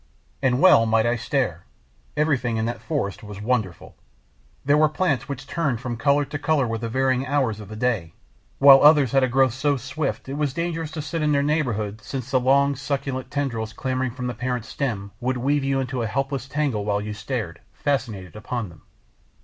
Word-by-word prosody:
And 130 -2 +2
well 125 -11 +6
might 110 0 +3
I 120 +1 +2
stare! 115 - -2 0.5
Everything 130 -7 +1
in 110 - 0
that 120 +1 -4
forest 135 - -3
was 105 -2 -9
wonderful! 105 -5 -2 0.7
There 145 +1 +4
were 155 0 +4
plants 150 -4 -1
which 135 -2 -5
turned 140 -7 -1
from 125 -1 -4
colour 140 +4 +2
to 145 - -5
colour 145 -3 +2
with 115 -1 -3
the 115 - -3
varying 130 +1 +1
hours 130 -7 0
of 105 - -9
the 110 - -7
day. 110 -8 -1 0.4
While 135 -1 +8
others 145 -4 +6
had 135 -1 +3
a - - +3
growth 130 -1 +3
so 140 +2 +1
swift 135 +4 -4
it 135 - -5
was 145 -3 -1
dangerous 165 -2 -2
to 155 - -4
sit 165 +2 -3
in 150 -1 +2
their 140 0 +2
neighbourhood 120 -9 -1
since 130 +2 -6
the 130 - +4
long, 140 +2 +3
succulent 135 -2 -3
tendrils 115 -7 -2
clambering 130 +2 -2
from 125 +1 -6
the 125 - -2
parent 125 -1 -3
stem 110 -6 -3
would 125 +1 -1
weave 140 +3 +1
you 135 0 +1
into 130 -1 -2
a 115 - -1
helpless 135 +2 -2
tangle 140 -7 -1
while 100 0 0
you 105 +1 -5
gazed, 105 -5 -4
fascinated, 110 - -3
upon 110 0 -4
them. 85 -1 -16
130 Hz, 200 wpm, -23 LUFS, 115-140 Hz, 0.7 s, While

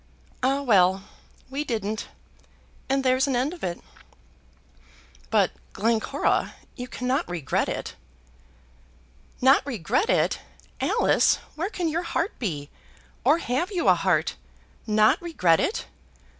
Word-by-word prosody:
Ah, 270 +2 +1
well! 190 -5 +4 0.5
we 280 +2 -2
didn't, 220 -5 -3 0.8
and 270 0 +1
there's 260 +1 +3
an 270 - 0
end 260 +7 0
of 355 - -12
it." 175 -1 -2 1.5
"But - - +3 0.2
Glencora, 230 +6 0 0.2
you 250 -1 -6
cannot 250 -1 -1
regret 165 -7 -1
it." - - -4 1.5
"Not 265 +2 +6
regret 255 - -1
it! - - +2 0.4
Alice, - - +3 0.2
where 345 +5 -3
can 360 -5 -2
your 325 +2 0
heart 340 +2 -2
be? 150 - -4 0.5
Or 305 - +5
have 335 - -1
you 355 - -1
a - - +8
heart? 175 - +1 0.5
Not 215 - +4
regret 185 - +2
it! - - -1
250 Hz, 120 wpm, -25 LUFS, 195-290 Hz, 1.5 s, a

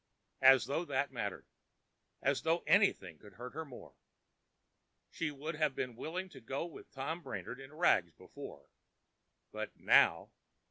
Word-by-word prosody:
As 130 -3 +8
though 140 +6 -1
that 140 -2 0
mattered!—as 120 +4 -5
though 165 +2 +1
anything 95 - +3
could 105 - -15
hurt 125 +1 -8
her 160 +2 -4
more! 135 -6 -12 1.2
She 165 - -2
would 150 +3 -5
have 155 -3 +1
been 125 -2 -3
willing 175 +9 -4
to 135 -6 -12
go 135 +7 -3
with 170 - -11
Tom 150 +6 -4
Brainard 135 -3 -6
in 135 +1 -10
rags 150 - +3
before—but - - -11
now! - - +5
135 Hz, 135 wpm, -34 LUFS, 125-160 Hz, 1.2 s, As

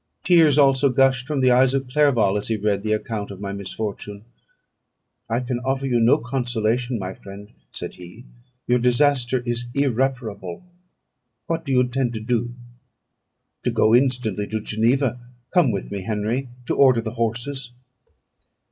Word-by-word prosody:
Tears 165 -5 +5
also 140 -1 +4
gushed 130 0 +2
from 150 -3 -1
the 130 -1 +4
eyes 130 +2 +4
of 135 -1 -2
Clerval, 125 -8 +2
as 105 - -1
he 110 - 0
read 100 -1 0
the 110 +1 -2
account 105 -1 -3
of 100 -2 -9
my 100 -1 -5
misfortune. 100 +1 -6 1.0
"I 115 +2 0
can 125 -1 -3
offer 135 +2 -2
you 125 -3 +1
no 115 +2 +5
consolation, 120 0 -1
my 95 -2 -5
friend," 100 +1 -12 0.2
said - - -6
he; 90 +6 -12 0.4
"your 125 0 +2
disaster 125 0 +2
is 120 0 -2
irreparable. 125 - -2 0.8
What 165 -1 -3
do 140 - -3
you 125 -1 +4
intend 125 -1 -1
to - - -3
do?" 120 +1 -2 1.1
"To - - 0
go 110 - +2
instantly 120 -5 +1
to 110 - -3
Geneva: 120 +4 0 0.3
come 175 -8 +4
with 100 -4 -4
me, 100 -1 -4
Henry, 110 +6 -2 0.2
to - - -1
order 130 -4 +5
the 110 -1 -5
horses." 120 +3 -3
120 Hz, 155 wpm, -22 LUFS, 110-130 Hz, 1.1 s, Tears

